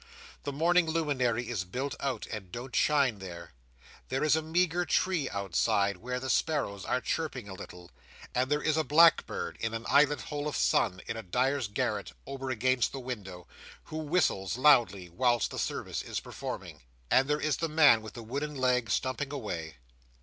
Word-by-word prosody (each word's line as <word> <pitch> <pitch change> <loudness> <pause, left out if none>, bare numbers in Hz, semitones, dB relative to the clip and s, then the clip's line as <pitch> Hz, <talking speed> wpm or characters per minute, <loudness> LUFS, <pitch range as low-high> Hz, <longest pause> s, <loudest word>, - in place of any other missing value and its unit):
The 145 - -2
morning 170 +4 +3
luminary 130 -7 0
is 115 -6 -2
built 130 +10 -4
out, 130 -5 -2
and 100 -5 -6
don't 125 +4 -7
shine 140 -8 +3
there. 85 -3 -9 0.6
There 130 +2 -1
is 155 0 +4
a 160 - +1
meagre 175 +2 +1
tree 175 -8 +1
outside, 100 0 +1
where 125 +5 -4
the 130 - -5
sparrows 130 -10 0
are 125 - +1
chirping 140 -9 -3
a 100 - -7
little; 90 -1 -11 0.4
and 125 +1 +1
there 150 0 +1
is 155 0 +2
a 160 - +2
blackbird 165 +2 +4
in 115 0 -2
an 115 +1 -5
eyelet 145 +1 +4
hole 145 0 -4
of 150 - -3
sun 75 +9 +2
in 115 - -4
a - - -4
dyer's 125 +6 0
garret, 105 -2 -2
over 135 -1 -5
against 130 0 +1
the 135 - -4
window, 100 -9 -7 0.4
who 155 - -7
whistles 150 - 0
loudly 120 -10 +4
whilst 120 +5 +1
the - - -5
service - - -3
is - - -4
performing; - - -7 0.3
and 135 +1 +5
there 150 +1 +1
is 155 -1 0
the 165 - -2
man 150 -7 +6
with 110 - -9
the 120 - -7
wooden 140 +6 -4
leg 125 -3 +1
stumping 130 +2 -1
away. 85 - -5
130 Hz, 180 wpm, -30 LUFS, 110-150 Hz, 0.6 s, man